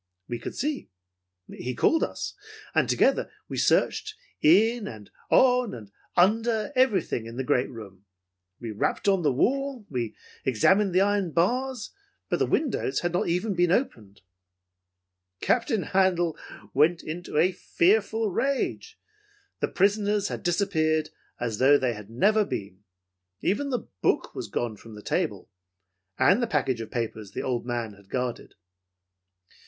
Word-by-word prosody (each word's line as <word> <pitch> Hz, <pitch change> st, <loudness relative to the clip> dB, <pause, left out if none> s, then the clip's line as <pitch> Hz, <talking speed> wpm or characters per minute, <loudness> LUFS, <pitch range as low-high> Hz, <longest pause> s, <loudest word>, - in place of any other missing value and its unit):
We 120 Hz, -1 st, -4 dB
could -, -, -6 dB
see. 295 Hz, +1 st, -3 dB, 0.6 s
He 125 Hz, 0 st, -5 dB
called 325 Hz, -, +3 dB
us, -, -, -4 dB, 0.4 s
and -, -, +2 dB
together -, -, +2 dB, 0.2 s
we -, -, -5 dB
searched 430 Hz, 0 st, +1 dB, 0.3 s
in 220 Hz, +8 st, +4 dB
and 105 Hz, -3 st, -10 dB, 0.2 s
on 250 Hz, -, +4 dB
and 105 Hz, -4 st, -11 dB, 0.3 s
under 225 Hz, +7 st, +2 dB
everything 200 Hz, -, +1 dB
in 115 Hz, +1 st, -9 dB
the 130 Hz, -, -1 dB
great 125 Hz, 0 st, +1 dB
room. 100 Hz, -5 st, -11 dB, 0.5 s
We 115 Hz, -2 st, -5 dB
rapped 105 Hz, -, -1 dB
on 195 Hz, -2 st, +4 dB
the 150 Hz, -4 st, +2 dB
wall. 265 Hz, -, 0 dB
We 120 Hz, -4 st, -3 dB, 0.3 s
examined 190 Hz, -, +3 dB
the 185 Hz, -, +5 dB
iron 200 Hz, -4 st, +1 dB
bars, 250 Hz, +7 st, 0 dB, 0.4 s
but -, -, 0 dB
the -, -, +2 dB
windows 235 Hz, -, 0 dB
had 175 Hz, 0 st, -1 dB
not 175 Hz, -, 0 dB
even 180 Hz, +5 st, 0 dB
been 175 Hz, -1 st, +2 dB
opened. 110 Hz, -, -2 dB, 1.2 s
"Captain 225 Hz, -, +1 dB
Handel 180 Hz, -4 st, +2 dB, 0.4 s
went 160 Hz, +5 st, +3 dB
into 165 Hz, 0 st, -5 dB
a 175 Hz, +4 st, +4 dB
fearful 210 Hz, +4 st, +1 dB
rage. 280 Hz, -, -2 dB, 0.6 s
The -, -, +1 dB
prisoners 205 Hz, +1 st, +1 dB
had -, -, -5 dB
disappeared 160 Hz, -4 st, +1 dB, 0.3 s
as 115 Hz, -3 st, -3 dB
though 140 Hz, +2 st, +6 dB
they 130 Hz, -3 st, 0 dB
had 105 Hz, -1 st, -10 dB
never 210 Hz, -, +3 dB
been. 100 Hz, -, -6 dB, 0.6 s
Even 280 Hz, +9 st, 0 dB
the 250 Hz, -3 st, -3 dB
book -, -, +1 dB
was -, -, -5 dB
gone 115 Hz, -3 st, -3 dB
from 110 Hz, 0 st, -12 dB
the 105 Hz, -, -11 dB
table, -, -, -2 dB, 0.7 s
and 185 Hz, -, +4 dB
the 240 Hz, -, +1 dB
package 130 Hz, -, 0 dB
of 110 Hz, -, -7 dB
papers 110 Hz, -4 st, -4 dB
the -, -, -3 dB
old 125 Hz, -2 st, -2 dB
man 120 Hz, -3 st, -3 dB
had 100 Hz, -1 st, -20 dB
guarded. 125 Hz, -1 st, -3 dB
175 Hz, 150 wpm, -26 LUFS, -, 1.2 s, though